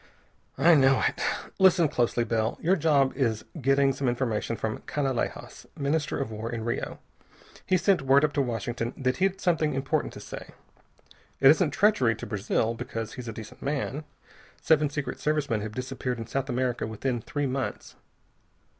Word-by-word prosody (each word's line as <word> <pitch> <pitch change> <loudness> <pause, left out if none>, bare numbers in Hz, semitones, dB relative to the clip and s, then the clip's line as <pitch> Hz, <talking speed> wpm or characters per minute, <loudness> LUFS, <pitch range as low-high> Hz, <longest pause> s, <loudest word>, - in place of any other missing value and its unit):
"I 165 +6 +6
know 135 -3 +5
it. - - -4 0.4
Listen 180 -3 +5
closely, 120 -3 +1
Bell. 110 -1 -1
Your 180 +4 +3
job 145 -5 +3
is 115 -6 0 0.2
getting 135 +1 +3
some 130 -1 -1
information 115 -2 -1
from 110 0 -3
Canalejas, 135 -5 -3
Minister 145 +2 -1
of 135 -5 -3
War 110 +2 -5
in 115 -2 -4
Rio. 120 - -3 0.7
He 185 - +4
sent 190 -2 +2
word 135 +2 +5
up 150 - -3
to 145 - +2
Washington 120 -1 -3
that 130 -1 0
he'd 190 0 +1
something 160 -6 +1
important 135 0 -1
to - - -9
say. - - -9 0.8
It 135 0 +8
isn't 160 +1 +3
treachery 145 - +3
to 110 - -7
Brazil, 110 +2 0
because 115 -2 -5
he's 125 -1 -8
a - - -3
decent 110 0 -10
man. 145 +1 -2 0.6
Seven 155 -2 +3
Secret 145 0 -4
Service 150 -1 0
men 110 -2 +1
have 105 0 -5
disappeared 125 0 -3
in 115 - -5
South 135 +4 -3
America 125 -2 -1
within 120 +2 -2
three 145 +5 -3
months. 130 -1 -4
135 Hz, 170 wpm, -27 LUFS, 115-150 Hz, 0.8 s, It